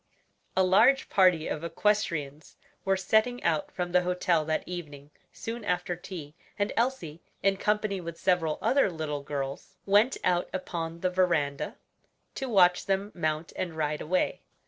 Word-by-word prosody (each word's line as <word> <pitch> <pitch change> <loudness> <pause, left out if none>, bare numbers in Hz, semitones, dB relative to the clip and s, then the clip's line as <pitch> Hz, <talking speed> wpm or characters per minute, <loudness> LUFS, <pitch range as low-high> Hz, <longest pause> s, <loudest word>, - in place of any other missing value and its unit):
A 190 - +5
large 225 +9 +4
party 180 -5 +4
of 155 - -3
equestrians 165 -5 -1 0.3
were 195 0 +2
setting 220 +6 +1
out 160 -3 0
from 175 -1 -3
the 180 0 +4
hotel 180 -2 +1
that 155 0 -1
evening 150 -5 -8 0.2
soon 230 0 -6
after 180 -2 -1
tea, 170 -4 -8 0.2
and 205 0 -1
Elsie, 225 - -1 0.2
in 195 0 +3
company 210 -1 0
with 170 -1 -7
several 170 -4 +1
other 275 -6 +3
little 155 -4 -4
girls, 140 -1 -5
went 205 +6 +4
out 175 -1 +1
upon 170 -2 -4
the 185 - +1
veranda 170 -6 0 0.6
to 265 - -4
watch 180 -5 +4
them 195 +1 0
mount 155 -1 -2
and 170 -3 -4
ride 150 -1 -1
away. 180 +4 0
180 Hz, 150 wpm, -28 LUFS, 160-195 Hz, 0.6 s, A